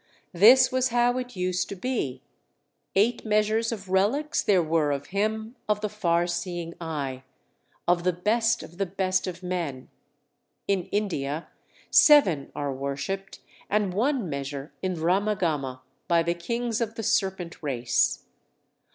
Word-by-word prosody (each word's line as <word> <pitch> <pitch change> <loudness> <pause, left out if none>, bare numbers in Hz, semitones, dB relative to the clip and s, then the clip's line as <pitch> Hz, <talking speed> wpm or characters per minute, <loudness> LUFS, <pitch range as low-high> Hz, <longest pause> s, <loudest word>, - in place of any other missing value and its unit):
This 240 +8 +7
was 255 0 +2
how 245 +1 +2
it 250 -2 -7
used 180 0 -1
to - - -5
be. 180 - -3 0.7
Eight 215 +5 +2
measures 215 +1 +1
of 200 -4 -6
relics 215 - +1
there 190 -5 +3
were 155 -2 +1
of 140 0 -3
him 220 +3 -1
of 210 0 +1
the 210 - -1
far 175 -5 +1
seeing 175 -1 -4
eye, 140 -5 -4 0.7
of 175 0 +3
the 180 - +3
best 225 +6 +1
of 175 +3 -13
the 195 - 0
best 185 0 0
of 185 0 -6
men. 170 -8 -4 0.8
In 195 -3 +1
India 165 -7 -2 0.4
seven 190 - +6
are 140 -1 -2
worshipped, 140 +9 -4 0.3
and 205 -3 +1
one 245 +1 0
measure 140 0 -5
in 185 -1 -1
Ramagama, 165 -7 0 0.3
by 170 -1 +3
the 170 +1 0
kings 235 +6 -2
of 225 -1 -2
the 225 - -5
serpent 190 -5 -1
race. 125 -6 0
185 Hz, 145 wpm, -26 LUFS, 165-215 Hz, 0.8 s, This